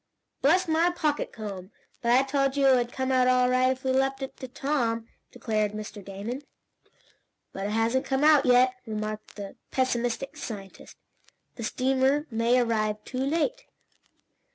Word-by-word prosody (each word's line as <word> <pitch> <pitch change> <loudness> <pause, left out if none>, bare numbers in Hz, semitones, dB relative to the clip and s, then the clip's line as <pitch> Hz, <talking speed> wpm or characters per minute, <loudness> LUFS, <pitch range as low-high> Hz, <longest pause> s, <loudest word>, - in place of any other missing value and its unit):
"Bless 355 +6 +3
my 325 +2 +3
pocket 315 -4 -1
comb! 195 -4 -7 0.3
But 235 - +1
I 260 +2 +5
told 275 0 0
you 280 - +3
it 265 -1 +7
would 240 -1 0
come 260 0 -2
out 255 -1 +4
all 250 0 +4
right, 255 0 +3
if 260 0 -5
we 260 - +1
left 270 +1 +1
it 265 - -6
to 260 - -7
Tom!" 240 -4 -1 0.2
declared 215 -2 -1
Mr. 210 -1 -7
Damon. 200 +7 -6 1.1
"But 195 +1 -3
it 210 - -3
hasn't 230 +4 +1
come 270 +1 0
out 300 -2 +6
yet," 250 -1 +5
remarked 215 0 -5
the 200 -2 -8
pessimistic 255 +2 -1
scientist. 200 -9 -8 0.6
"The 235 - -7
steamer 265 +5 +1
may 230 +2 +2
arrive 215 -3 0
too 255 - -5
late." 330 - -1
255 Hz, 160 wpm, -27 LUFS, 225-270 Hz, 1.1 s, it